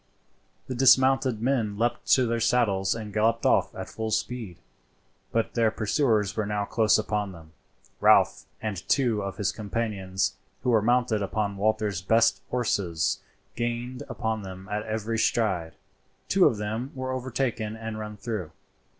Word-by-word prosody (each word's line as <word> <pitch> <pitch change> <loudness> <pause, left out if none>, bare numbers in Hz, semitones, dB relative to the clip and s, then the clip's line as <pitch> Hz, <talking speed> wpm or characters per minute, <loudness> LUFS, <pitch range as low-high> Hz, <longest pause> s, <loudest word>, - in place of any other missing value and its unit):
The 130 - -4
dismounted 130 -2 +4
men 115 -6 0
leaped 120 +2 -1
to 130 - +4
their 115 0 0
saddles 110 -5 +2
and 110 -2 -7
galloped 110 +2 +1
off - - +3
at - - -6
full 110 0 -4
speed, 110 -4 -3 0.7
but 115 -1 0
their 115 -2 +3
pursuers 110 -2 +1
were 110 -2 -1
now 105 -1 -1
close 110 0 +3
upon 105 -2 -2
them. 80 -2 -14 0.5
Ralph - - +4 0.2
and 105 -3 -2
two 120 -6 +2
of 100 -1 -5
his 100 -3 0
companions, 100 -3 -2 0.3
who 125 - +2
were 110 -2 +4
mounted 120 -1 +2
upon 100 0 -1
Walter's 105 -2 0
best 115 +5 +3
horses, 95 -10 0 0.4
gained 120 +2 -3
upon 110 -2 -2
them 95 -1 -9
at 105 +1 -1
every 110 +1 -2
stride. 95 -9 0 0.5
Two 190 -1 +5
of 115 - 0
them 110 +6 -3
were 130 0 -3
overtaken 125 -4 -2
and 110 -1 -6
run 105 -1 -6
through. 105 -9 -4
110 Hz, 150 wpm, -27 LUFS, 100-120 Hz, 0.7 s, Two